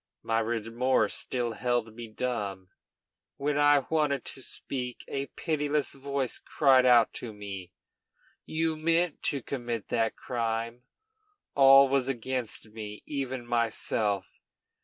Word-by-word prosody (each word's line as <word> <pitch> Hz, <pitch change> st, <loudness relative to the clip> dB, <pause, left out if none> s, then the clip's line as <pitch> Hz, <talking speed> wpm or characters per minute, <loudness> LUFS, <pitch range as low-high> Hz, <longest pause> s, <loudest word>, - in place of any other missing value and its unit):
My 115 Hz, 0 st, +1 dB
remorse 115 Hz, +1 st, +1 dB
still 120 Hz, -2 st, -2 dB
held 120 Hz, -1 st, -1 dB
me 120 Hz, 0 st, -8 dB
dumb. 105 Hz, -5 st, -3 dB, 0.7 s
When 145 Hz, +1 st, 0 dB
I 145 Hz, -2 st, +5 dB
wanted 150 Hz, -4 st, +1 dB
to 130 Hz, -, -5 dB
speak, 125 Hz, -1 st, -5 dB
a 140 Hz, 0 st, -3 dB
pitiless 150 Hz, -2 st, -1 dB
voice 140 Hz, -2 st, -2 dB
cried 130 Hz, -3 st, +4 dB
out 120 Hz, -3 st, +6 dB
to 120 Hz, -, -6 dB
me, 100 Hz, -3 st, -8 dB, 0.7 s
'You 160 Hz, 0 st, -1 dB
meant 165 Hz, +1 st, +1 dB
to 140 Hz, -4 st, 0 dB
commit 120 Hz, -5 st, -4 dB
that 115 Hz, -2 st, +1 dB
crime!' 115 Hz, 0 st, -3 dB, 0.7 s
All 135 Hz, 0 st, +8 dB
was 135 Hz, -1 st, +1 dB
against 125 Hz, -3 st, -3 dB
me, 105 Hz, -1 st, -8 dB
even 130 Hz, -4 st, -3 dB
myself. 110 Hz, -4 st, -1 dB
125 Hz, 120 wpm, -29 LUFS, 115-140 Hz, 0.7 s, All